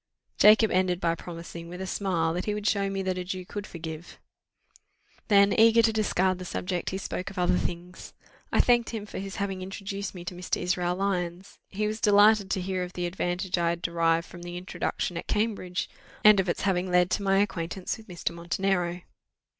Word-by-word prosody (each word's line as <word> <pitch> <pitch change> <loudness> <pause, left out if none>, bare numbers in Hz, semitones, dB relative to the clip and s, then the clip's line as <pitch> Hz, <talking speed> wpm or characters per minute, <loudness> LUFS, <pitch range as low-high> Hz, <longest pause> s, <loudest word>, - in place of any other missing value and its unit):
Jacob 215 +1 +7
ended 180 -1 +2
by 165 -2 +1
promising, 170 0 -8
with 180 +1 -8
a 190 - -3
smile, 175 -4 0
that 180 +2 -3
he 210 - -1
would 210 -1 -5
show 200 -2 +1
me 195 0 -2
that 185 -1 -1
a - - -3
Jew 185 0 -5
could 205 +2 -6
forgive. 160 0 -8 1.1
Then, 200 -1 +5
eager 230 +1 +6
to 225 0 +3
discard 190 -4 +1
the - - -6
subject, 180 0 -3
he 190 - -3
spoke 185 -1 -4
of 195 - -12
other 180 0 +2
things. 175 +1 -6 0.4
I - - +5
thanked 240 -1 +3
him 220 -3 -5
for - - -7
his 195 0 -6
having 195 -2 -3
introduced 195 +1 -5
me 175 -1 -8
to 180 - -5
Mr. 180 +1 -2
Israel 180 0 0
Lyons: 185 -1 -3
he 210 +2 -2
was 215 +1 -3
delighted 205 -1 +5
to 190 - 0
hear 185 0 -2
of 180 0 -5
the 180 - -2
advantage 180 +1 -2
I 170 -1 +2
had 170 0 -3
derived 165 0 +1
from 175 - -12
this 175 0 -7
introduction 175 -1 -3
at - - -6
Cambridge, 210 -5 -1 0.4
and 210 -2 +8
of 190 -1 +1
its - - -1
having 185 -1 0
led 180 0 +3
to - - +1
my 195 -1 +2
acquaintance 185 -2 -1
with 220 0 -15
Mr. 175 -3 -3
Montenero. 175 +1 -1
185 Hz, 205 wpm, -27 LUFS, 175-200 Hz, 1.1 s, and